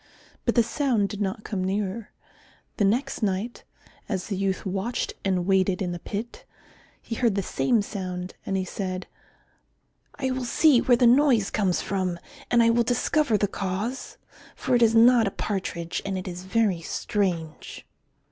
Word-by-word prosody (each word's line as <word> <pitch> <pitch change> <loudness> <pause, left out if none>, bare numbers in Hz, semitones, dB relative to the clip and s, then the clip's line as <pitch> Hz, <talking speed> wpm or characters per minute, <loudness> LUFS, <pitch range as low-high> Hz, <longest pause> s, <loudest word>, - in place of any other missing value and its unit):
But - - +1
the 235 - +5
sound 235 -5 0
did 205 +1 -6
not 205 +2 -2
come 195 -4 -3
nearer. 200 +3 -2 0.7
The 205 - +3
next 235 +8 0
night, 205 +3 -2 0.5
as 190 -4 -2
the 200 - -1
youth 190 +1 -1
watched 195 +5 -2
and 185 -2 0
waited 190 -1 +2
in 180 -2 -2
the 175 - -5
pit, 215 +6 -6 0.6
he - - -7
heard 230 -3 +1
the 200 - 0
same 190 - +1
sound, 185 -3 -5
and 195 - -1
he 190 - -1
said, 185 0 -4 1.1
"I 265 -2 -2
will 255 0 -2
see 255 +2 +4
where 245 -2 +4
the 245 - +4
noise 245 -4 +4
comes 190 -4 +1
from 185 -3 -1 0.3
and 240 -1 +5
I 230 - +5
will 235 +1 +3
discover 245 +1 +2
the 205 - +1
cause, 200 +7 -4 0.4
for - - -2
it 240 - +4
is 230 -1 +5
not 230 -1 +6
a - - +2
partridge, 180 -4 -3
and 195 -1 -3
it 185 - -6
is 180 0 -6
very 195 -4 +1
strange." 170 -4 -3
200 Hz, 170 wpm, -25 LUFS, 185-235 Hz, 1.1 s, not